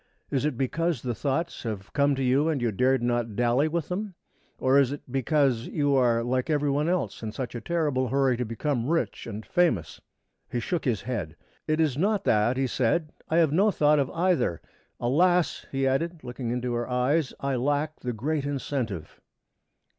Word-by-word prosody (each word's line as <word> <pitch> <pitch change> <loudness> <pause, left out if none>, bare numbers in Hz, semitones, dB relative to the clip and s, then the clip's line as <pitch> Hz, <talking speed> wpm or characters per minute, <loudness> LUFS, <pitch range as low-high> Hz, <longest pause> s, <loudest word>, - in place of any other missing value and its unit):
Is 135 +1 0
it 150 -5 -1
because 155 +2 -1
the 125 -2 -1
thoughts 150 +8 -2
have 105 -5 -6
come 140 -1 +3
to 135 - -2
you 135 +5 +3
and 155 -4 0
you 120 -2 0
dared 130 +4 +2
not 120 -3 0
daily 120 +5 +2
with 165 0 -2
them? 195 +1 -3 0.4
Or 130 +2 +4
is 135 -2 +3
it 145 - -6
because 135 -2 +1
you 145 -2 +1
are 120 -3 +3
like 130 +4 -1
every 145 -2 +1
one 150 +4 +1
else 170 - -1
in 110 -1 -4
such 125 +2 -5
a 120 - -5
terrible 150 -4 0
hurry 135 0 +2
to 125 - -1
become 120 +2 -2
rich 165 -6 -1
and 110 -1 -6
famous?" 165 - +1 0.5
He 120 - -1
shook 165 +8 -2
his 115 -7 0
head. 100 -10 -4 0.3
"It 155 0 +1
is 150 -4 +1
not 200 +2 +1
that," 110 +4 +2
he 135 - +1
said. 130 +6 0 0.2
"I 160 - +2
have 165 -4 +4
no 195 +7 +4
thought 150 -5 +3
of 140 -1 0
either. 165 - +1 0.4
Alas!" 175 +8 +2
he 135 0 0
added, 160 +5 -1
looking 125 -1 -5
into 125 0 -2
her 120 +1 -2
eyes, 130 +4 +1
"I 140 -1 -1
lack 145 +4 -1
the 125 - -3
great 140 +6 -2
incentive!" 130 - -4
135 Hz, 190 wpm, -27 LUFS, 120-155 Hz, 0.5 s, Or